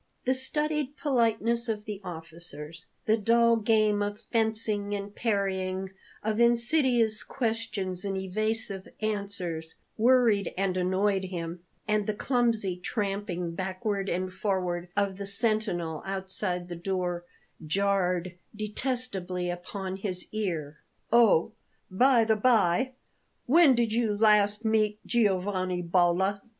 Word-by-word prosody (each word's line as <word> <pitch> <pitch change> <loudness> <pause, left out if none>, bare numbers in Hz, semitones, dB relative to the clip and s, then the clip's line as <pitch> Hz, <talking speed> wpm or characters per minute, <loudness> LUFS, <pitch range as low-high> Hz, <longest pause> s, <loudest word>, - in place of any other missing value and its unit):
The 260 - +3
studied 300 +2 -1
politeness 235 -4 +1
of 210 -1 -3
the 210 -2 -6
officers, 165 -2 -8 0.2
the 220 +1 +3
dull 230 +2 +4
game 215 -1 +2
of 205 +1 -3
fencing 220 -3 0
and 200 0 -6
parrying, 190 -3 -1 0.3
of 215 +1 -1
insidious 235 -2 +3
questions 220 -6 -3
and 195 -1 -2
evasive 205 +1 -2
answers, 200 -7 -3 0.2
worried 230 -5 +3
and 190 -1 0
annoyed 190 +2 +1
him, 175 -2 -5 0.3
and 210 -1 +1
the 215 - -1
clumsy 225 -6 +1
tramping 195 -4 -3
backward 190 +2 -2
and 185 +1 -2
forward 180 -3 -2
of 200 -2 +1
the 200 0 -5
sentinel 200 -6 -1
outside 190 -2 -3
the 175 - -6
door 180 -1 -2 0.4
jarred 185 0 0 0.2
detestably 210 -5 -2
upon 185 +2 -5
his 190 -2 -3
ear. 165 -9 -3 0.3
"Oh, 225 -5 +5 0.4
by 240 +3 +4
the 220 0 +3
bye, 230 +1 +3 0.5
when 295 0 +6
did 235 -2 +1
you 225 -3 +1
last 210 0 +4
meet 215 -1 +1
Giovanni 185 -5 0
Bolla?" 180 +3 +2
200 Hz, 115 wpm, -28 LUFS, 185-225 Hz, 0.5 s, when